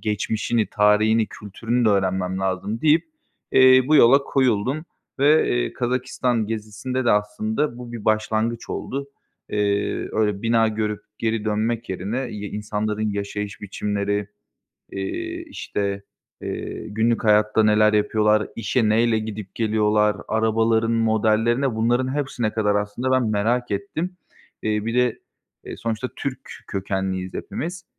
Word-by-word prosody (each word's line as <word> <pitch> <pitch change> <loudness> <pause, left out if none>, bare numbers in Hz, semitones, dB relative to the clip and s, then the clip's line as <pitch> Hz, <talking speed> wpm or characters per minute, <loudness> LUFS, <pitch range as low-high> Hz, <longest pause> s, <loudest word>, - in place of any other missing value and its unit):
geçmişini, 110 +2 0
tarihini, 105 +2 +3
kültürünü 115 +5 -3
de - - +5
öğrenmem 95 -1 0
lazım." 95 +4 -2
deyip, 155 +1 +4 0.5
eee, 130 0 +7
bu 155 - +6
yola 135 +3 +7
koyuldum 130 +4 +1 0.3
ve, 150 +3 +4
eee, - - 0
Kazakistan 125 -2 -1
gezisinde 115 +4 -3
de 120 - +3
aslında 110 +5 -1
bu 120 -1 -8
bir 115 -3 -7
başlangıç 110 +2 0
oldu. 140 +1 -4 0.4
Eee, 100 -1 0
öyle, 105 -2 0
bina 115 -1 +3
görüp 105 -1 -2 0.2
geri 110 -1 -1
dönmek 110 +2 -1
yerine 95 +6 -3
y 105 -1 -6
insanların 105 0 -2
yaşayış 100 0 -4
biçimleri, 100 0 -2 0.6
eee, 335 - -4
işte, 100 - -3 0.4
eee, 110 - -5
günlük 110 +3 +1
hayatta 105 0 +4
neler 105 0 +4
yapıyorlar? 105 0 +2
İşe 115 0 +1
neyle 115 0 +3
gidip 110 -3 -7
geliyorlar? 105 -2 +2
Arabaların 110 +1 +2
modellerine, 115 +3 +2
bunların 120 +4 +1
hepsine 125 -6 -1
kadar, 105 -2 +1
aslında, 105 +6 -1
ben 130 -3 +2
merak 120 +4 0
ettim. 185 -2 -3 0.5
Eee, 105 0 0
bir 115 +1 -2
de, 125 -2 +2 0.5
eee, - - -7
sonuçta 115 +2 -3
Türk 140 -2 -4 0.3
kökenliyiz 95 -1 -3
hepimiz, 175 +2 -5
110 Hz, 130 wpm, -23 LUFS, 105-120 Hz, 0.6 s, eee